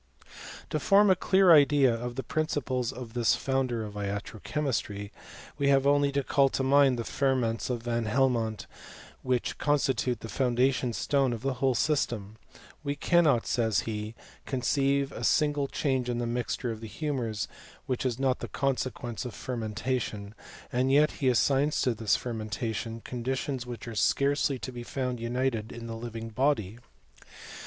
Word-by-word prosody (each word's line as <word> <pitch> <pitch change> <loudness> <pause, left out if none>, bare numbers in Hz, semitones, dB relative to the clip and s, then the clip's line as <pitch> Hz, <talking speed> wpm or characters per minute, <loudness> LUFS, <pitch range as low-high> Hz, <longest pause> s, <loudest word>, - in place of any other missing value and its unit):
To 155 - 0
form 200 +7 +5
a - - +5
clear 190 -1 +5
idea 145 -4 +5
of 120 +1 -4
the 135 - -3
principles 130 -4 -1
of 120 -3 -9
this 120 -2 +3
founder 130 -4 -1
of 105 -1 -7
iatro 105 +2 -5
chemistry, 110 -9 -2 0.5
we 140 - +2
have 135 -1 +4
only 145 0 +3
to 140 0 +1
call 135 +1 +3
to 135 - -1
mind 135 -1 +4
the 115 - -2
ferments 125 -3 0
of 120 -2 -2
Van 120 -1 -1
Helmont, 115 -3 +1 0.6
which 125 -2 -1
constitute 135 -4 +1
the - - -6
foun 125 +1 0
dation 125 -2 +2
stone 135 -3 +1
of 115 0 -6
the 135 -1 0
whole 135 -2 +3
system. 115 -8 -1 0.5
We 145 -1 -2
cannot, 150 -5 +3
says 110 -4 +1
he, 110 0 -5 0.3
conceive 140 +2 +1
a - - -7
single 145 -2 +2
change 130 -3 -1
in 120 - -1
the 120 - -1
mixture 120 +1 -2
of 110 -1 -7
the 110 - -6
humours, 115 -4 -3 0.4
which 130 -2 -2
is 125 -3 -1
not 135 -1 +1
the - - -5
consequence 130 -3 -2
of 125 - -6
fermenta 120 +1 -2
tion; 100 -1 -6 0.4
and 130 +2 +2
yet 150 +2 +5
he 135 - -2
assigns 140 +4 +2
to 125 -3 +2
this 110 -1 +1
fermentation 115 0 -4
con 125 -2 -5
ditions 130 0 -2
which 120 -1 -7
are 115 - -5
scarcely 140 +5 +2
to 130 - -6
be 120 -1 -7
found 125 0 -3
united 115 -1 -1
in 120 0 -8
the 115 -1 -5
living 115 0 -6
body. 115 -3 0
125 Hz, 170 wpm, -28 LUFS, 115-140 Hz, 0.6 s, form